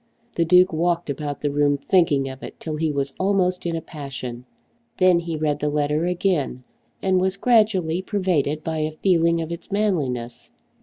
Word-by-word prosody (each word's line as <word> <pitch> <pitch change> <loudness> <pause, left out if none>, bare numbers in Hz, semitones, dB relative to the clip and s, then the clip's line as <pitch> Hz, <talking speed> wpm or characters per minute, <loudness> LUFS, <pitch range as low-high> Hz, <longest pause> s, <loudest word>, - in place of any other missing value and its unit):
The 170 - +1
Duke 180 +1 +5
walked 170 -1 0
about 145 0 -5
the 145 - 0
room 145 0 +2
thinking 145 -3 +2
of 130 0 -8
it - - -9
till 155 -2 -4
he 155 0 0
was 140 -1 -2
almost 185 -2 +1
in 165 - -1
a 165 - -3
passion. 130 -6 -7 0.5
Then 185 -2 +5
he 165 -2 -4
read 150 -1 0
the 150 - 0
letter 150 +2 0
again 175 -8 -1 0.4
and 185 -1 +2
was 190 +1 0
gradually 195 -7 +2
pervaded 175 -7 -1
by 160 -1 -2
a 155 0 0
feeling 170 0 +2
of 165 0 -5
its 170 +4 -8
manliness. 140 - -2
160 Hz, 175 wpm, -23 LUFS, 145-180 Hz, 0.5 s, Duke